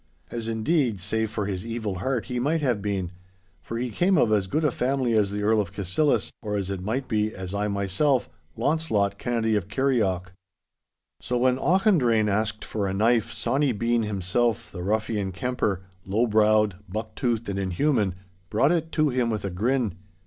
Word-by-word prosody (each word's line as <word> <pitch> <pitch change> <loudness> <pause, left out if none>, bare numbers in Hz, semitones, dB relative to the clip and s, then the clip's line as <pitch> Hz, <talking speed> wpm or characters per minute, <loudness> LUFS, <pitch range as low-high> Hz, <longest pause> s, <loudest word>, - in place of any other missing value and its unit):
As, 115 -1 -4
indeed, 115 - +1
save 110 +4 -1
for 105 -1 -2
his 95 -2 -3
evil 110 -5 -3
heart 125 +4 -1
he 125 -1 -3
might 155 +6 +1
have 125 -7 +1
been, 95 -3 -2 0.5
for 115 +10 -5
he 125 0 -2
came 180 - +2
of 115 -7 +3
as 100 -3 +2
good 155 +11 0
a 150 - +3
family 130 -1 0
as 105 -3 +3
the 105 +1 -3
Earl 110 +1 +3
of 95 -3 -5
Cassillis, 100 - +1
or, 105 -2 -2
as 100 -1 -2
it 95 -2 -4
might 125 +7 -2
be, 110 -1 0
as 95 0 -6
I 100 +1 0
myself, 100 +7 +1 0.3
Launcelot 115 -7 0
Kennedy 115 -2 0
of 100 -3 -1
Kirrieoch. 100 -7 0 0.9
So 125 - -1
when 130 +1 +2
Auchendrayne 145 - +3
asked 110 +1 -1
for 105 -2 -2
a 95 - -2
knife, 115 +2 +2
Sawny 135 +2 +1
Bean 115 +2 +1
himself, 105 +2 0
the 90 - -6
ruffian 105 0 -1
kemper, 100 -1 -1 0.2
low 105 +5 +1
browed, 105 -3 +3
buck 110 +3 -4
toothed, 120 -3 -1
and 100 -1 -2
inhuman, 100 - +1 0.3
brought 135 +8 +3
it 165 -2 0
to 155 -2 +3
him 125 -2 +1
with 105 -3 -2
a 100 - -2
grin. 115 +3 0
110 Hz, 185 wpm, -25 LUFS, 100-125 Hz, 0.9 s, of